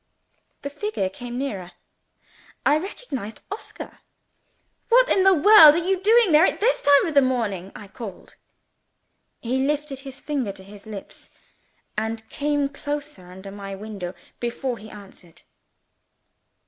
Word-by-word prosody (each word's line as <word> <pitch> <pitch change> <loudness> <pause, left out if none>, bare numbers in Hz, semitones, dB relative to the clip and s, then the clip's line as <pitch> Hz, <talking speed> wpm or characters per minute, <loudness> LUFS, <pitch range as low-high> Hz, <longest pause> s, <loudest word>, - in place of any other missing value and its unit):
The 280 - -4
figure 415 - -2
came 245 +5 -8
nearer. 195 -10 -4 0.9
I 300 - +4
recognized 275 - -7
Oscar. 410 - -8 0.9
"What - - +6
in 380 - +3
the 385 -1 +6
world 315 -3 +9
are 345 +1 -1
you 380 -1 +1
doing 445 -1 +4
there, 305 +1 +6
at - - +2
this 475 +4 +2
time 285 -1 +5
in - - -5
the 280 - +6
morning?" 215 -8 -1
I 205 - -10
called 195 -1 -9
out. - - -21 1.1
He 250 +3 -1
lifted 290 -1 -2
his 270 0 -10
finger 275 -8 -2
to 190 - -12
his 200 +2 -14
lips, 205 -3 -9 0.7
and 220 0 -3
came 290 -1 0
close 290 -2 -5
under 185 +2 -11
my 195 -1 -7
window 195 -3 -7 0.2
before 240 +1 -3
he 215 +1 -11
answered. 195 -5 -15
260 Hz, 145 wpm, -23 LUFS, 205-300 Hz, 1.1 s, world